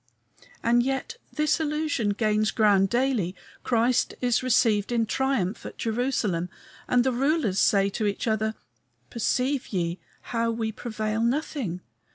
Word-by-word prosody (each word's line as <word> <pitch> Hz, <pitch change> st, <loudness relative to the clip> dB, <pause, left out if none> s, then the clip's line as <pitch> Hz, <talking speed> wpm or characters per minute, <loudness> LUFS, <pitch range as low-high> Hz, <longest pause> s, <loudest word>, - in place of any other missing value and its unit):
And 240 Hz, +1 st, +4 dB
yet 270 Hz, -, -2 dB
this 305 Hz, +1 st, +1 dB
illusion 300 Hz, -7 st, 0 dB
gains 215 Hz, 0 st, +1 dB
ground 200 Hz, -3 st, +3 dB
daily; 240 Hz, -7 st, 0 dB, 0.3 s
Christ 240 Hz, 0 st, +1 dB
is 245 Hz, -2 st, +1 dB
received 235 Hz, -4 st, +2 dB
in 230 Hz, -2 st, +2 dB
triumph 240 Hz, -6 st, -1 dB
at -, -, -8 dB
Jerusalem, 220 Hz, -7 st, -1 dB, 0.4 s
and 245 Hz, -1 st, +3 dB
the 260 Hz, -, +1 dB
rulers 260 Hz, -, +1 dB
say 195 Hz, -1 st, +4 dB
to 215 Hz, +1 st, -1 dB
each 200 Hz, -, -2 dB
other, 220 Hz, -1 st, 0 dB, 0.6 s
"Perceive 255 Hz, +3 st, 0 dB
ye 175 Hz, -2 st, -2 dB, 0.2 s
how 230 Hz, -1 st, -1 dB
we 225 Hz, -1 st, -2 dB
prevail 220 Hz, -1 st, -3 dB
nothing? 235 Hz, -, -1 dB
230 Hz, 135 wpm, -26 LUFS, 210-255 Hz, 0.6 s, And